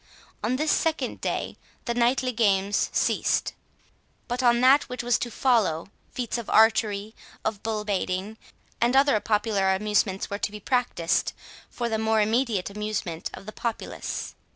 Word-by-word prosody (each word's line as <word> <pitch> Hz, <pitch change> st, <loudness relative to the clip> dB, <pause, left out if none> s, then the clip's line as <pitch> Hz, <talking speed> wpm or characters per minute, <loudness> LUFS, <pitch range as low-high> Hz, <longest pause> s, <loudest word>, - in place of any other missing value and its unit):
On 255 Hz, -, +1 dB
this 305 Hz, +3 st, +1 dB
second 320 Hz, -1 st, 0 dB
day -, -, -3 dB, 0.3 s
the 235 Hz, -, 0 dB
knightly 245 Hz, +2 st, +2 dB
games 200 Hz, -3 st, +2 dB
ceased. -, -, +1 dB, 0.7 s
But 245 Hz, +1 st, -2 dB
on 240 Hz, -1 st, +4 dB
that 270 Hz, +3 st, +6 dB
which 250 Hz, -1 st, -4 dB
was 240 Hz, -1 st, +2 dB
to 240 Hz, -, -3 dB
follow, 215 Hz, -10 st, +1 dB, 0.2 s
feats 245 Hz, -1 st, -3 dB
of 230 Hz, -, -7 dB
archery, 220 Hz, -1 st, +3 dB, 0.3 s
of 215 Hz, -2 st, -2 dB
bull 215 Hz, -1 st, -3 dB
baiting, 195 Hz, +1 st, -2 dB, 0.4 s
and 240 Hz, +2 st, +3 dB
other 275 Hz, -4 st, +5 dB
popular 205 Hz, -3 st, +1 dB
amusements, 210 Hz, -1 st, 0 dB
were 200 Hz, -, -4 dB
to 210 Hz, -, -2 dB
be 210 Hz, -, -8 dB
practised, 240 Hz, -7 st, 0 dB, 0.4 s
for 240 Hz, -, -3 dB
the 220 Hz, -1 st, -1 dB
more 220 Hz, 0 st, +2 dB
immediate 220 Hz, -3 st, +1 dB
amusement 210 Hz, -5 st, -3 dB
of -, -, -12 dB
the 215 Hz, -, -7 dB
populace. 235 Hz, -2 st, -4 dB
220 Hz, 155 wpm, -26 LUFS, 205-240 Hz, 0.7 s, that